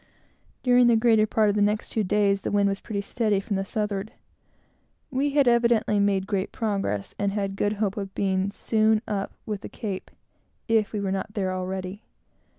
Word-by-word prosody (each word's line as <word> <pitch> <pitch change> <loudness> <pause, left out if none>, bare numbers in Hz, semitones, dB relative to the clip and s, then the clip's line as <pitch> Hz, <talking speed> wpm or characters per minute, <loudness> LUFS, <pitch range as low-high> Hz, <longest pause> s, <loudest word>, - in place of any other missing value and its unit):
During 245 -1 +5
the 235 - +5
greater 220 -1 +4
part 215 0 +2
of 205 - 0
the 210 - +1
next 210 +1 +1
two 220 - 0
days, 200 0 +2
the - - -3
wind 205 -1 +2
was 195 0 -1
pretty 200 -2 -4
steady 210 -1 0
from 200 +1 -3
the 195 - 0
southward. 210 0 -3 1.0
We 275 +2 +1
had 285 -3 +4
evidently 235 -3 +3
made 200 -1 +2
great 195 -2 -2
progress, 195 - -2
and 200 -1 0
had 195 -2 -2
good 205 +1 0
hope 205 -1 -1
of 195 -1 -5
being 190 0 0
soon 220 +1 +1
up 200 -2 -2
with 210 -2 -4
the - - -8
Cape, 200 -5 -5 0.6
if 220 -2 +2
we 210 - -2
were 195 -1 -1
not 195 +2 -3
there 190 -3 -1
already. 185 +2 -4
205 Hz, 190 wpm, -25 LUFS, 195-220 Hz, 1.0 s, During